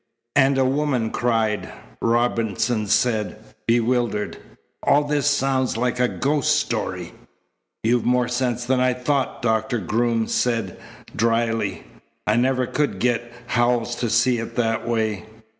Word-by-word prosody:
"And 135 0 +4
a 135 - +3
woman 130 -4 0
cried!" 115 -3 0 0.3
Robinson 115 -1 +1
said, 110 -3 +1 0.3
bewildered. 115 -2 +1 0.4
"All 145 +1 +3
this 145 0 +1
sounds 135 -3 +1
like 125 +1 -1
a 125 - +4
ghost 145 +3 +1
story." - - -3 0.7
"You've 120 +1 +2
more 125 0 +2
sense 125 -1 -1
than 130 +1 +1
I 125 0 +3
thought," 130 +1 -1
Doctor 110 +1 +1
Groom 115 +3 0
said 115 -7 -1 0.4
dryly. 115 -3 0 0.4
"I 105 - +2
never 130 +1 +2
could 150 +4 -1
get 120 -1 0
Howells 120 0 +1
to 120 - -1
see 120 +2 +3
it 115 - -6
that 115 -1 0
way." 110 -5 -1
120 Hz, 130 wpm, -22 LUFS, 115-125 Hz, 0.7 s, And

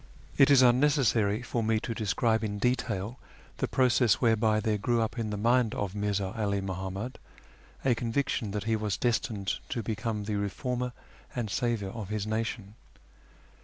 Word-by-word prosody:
It 135 - +6
is 135 -2 +7
unnecessary 120 -4 +3
for 120 -1 -2
me 110 0 +2
to 115 - -3
describe 110 +1 +1
in 105 -1 -2
detail 120 -1 -1 0.4
the - - -1
process 125 -4 +3
whereby 110 -2 +2
there 110 -1 0
grew 120 +3 +1
up 110 +1 -1
in 110 -2 -2
the 105 - -3
mind 120 +1 +2
of 100 -2 -2
Mirza 100 -1 -1
'Ali 100 -3 0
Muhammad 95 +5 -4 0.7
a 130 - +5
conviction 120 -1 -1
that 105 +1 -3
he 110 +1 +1
was 105 -3 -1
destined 110 -5 -1
to 120 -3 -2
become 110 -1 -2
the 105 0 -2
reformer 125 +5 -2 0.4
and 115 -5 -2
saviour 115 -5 -1
of 105 -3 -6
his 105 -1 -2
nation. 110 -1 -3
110 Hz, 165 wpm, -29 LUFS, 105-120 Hz, 0.7 s, is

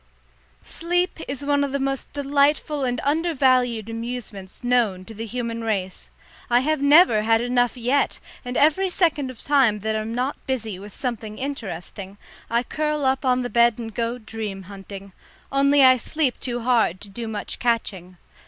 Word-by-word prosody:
Sleep 355 +1 -1
is 280 +1 -5
one 285 0 +2
of 280 -1 -3
the - - +1
most 270 0 -3
delightful 285 +1 +1
and 245 -2 -1
undervalued 260 - +2
amusements 230 -4 -7
known 230 -7 +1
to 225 - -10
the 225 +2 -6
human 230 0 -4
race. 195 -4 -3 0.4
I 240 +1 +4
have 305 +1 0
never 285 -6 +6
had 225 +1 +3
enough 245 +1 +1
yet, 250 +4 +1 0.2
and 250 0 -4
every 345 +6 +3
second 320 -7 +1
of 255 - -11
time 260 -8 +3
that 220 +1 -1
I'm 215 +1 -3
not 250 +4 -3
busy 225 -7 -3
with 205 +2 -10
something 225 -5 -4
interesting, 200 -7 -6 0.3
I 235 +1 +1
curl 300 +1 -2
up 265 +1 +1
on 255 -1 +2
the 245 - -3
bed 235 -1 +4
and 225 -2 -7
go 235 +1 -2
dream 215 -4 -6
hunting 195 0 -10 0.4
only 280 +1 +4
I 255 0 +7
sleep 285 +1 -1
too 245 -1 -3
hard 230 -7 +2
to 205 - -7
do 230 +4 -6
much 215 -2 -5
catching. 190 -7 -2
245 Hz, 170 wpm, -23 LUFS, 220-275 Hz, 0.4 s, I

